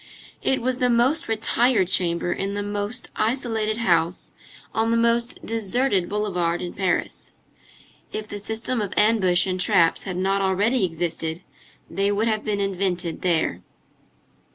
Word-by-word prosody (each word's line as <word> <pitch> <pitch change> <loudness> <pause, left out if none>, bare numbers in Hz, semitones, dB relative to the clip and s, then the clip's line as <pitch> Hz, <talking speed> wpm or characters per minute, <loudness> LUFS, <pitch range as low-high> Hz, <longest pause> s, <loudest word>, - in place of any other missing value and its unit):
It 265 -3 0
was 255 0 -1
the 250 - +2
most 245 +6 +2
retired 225 -1 +2
chamber 175 -1 +1
in 195 +1 -3
the 205 - -2
most 205 +4 -3
isolated 220 -2 0
house 175 -5 +1 0.4
on 225 +1 +1
the 230 - +2
most 235 +1 +1
deserted 225 -2 0
boulevard 180 -5 -1
in 175 - -5
Paris. 190 -2 -2 0.8
If 215 0 -4
the 205 -1 -6
system 225 +3 -2
of 200 -2 -4
ambush 190 -5 +4
and 185 -1 -2
traps 180 -3 +3
had 185 -3 -4
not 195 +1 +1
already 195 +4 +2
existed, 165 0 -3 0.4
they 200 +1 0
would 210 +3 0
have 215 -1 0
been 205 -1 -1
invented 185 -4 -2
there. 160 - 0
205 Hz, 145 wpm, -23 LUFS, 180-225 Hz, 0.8 s, ambush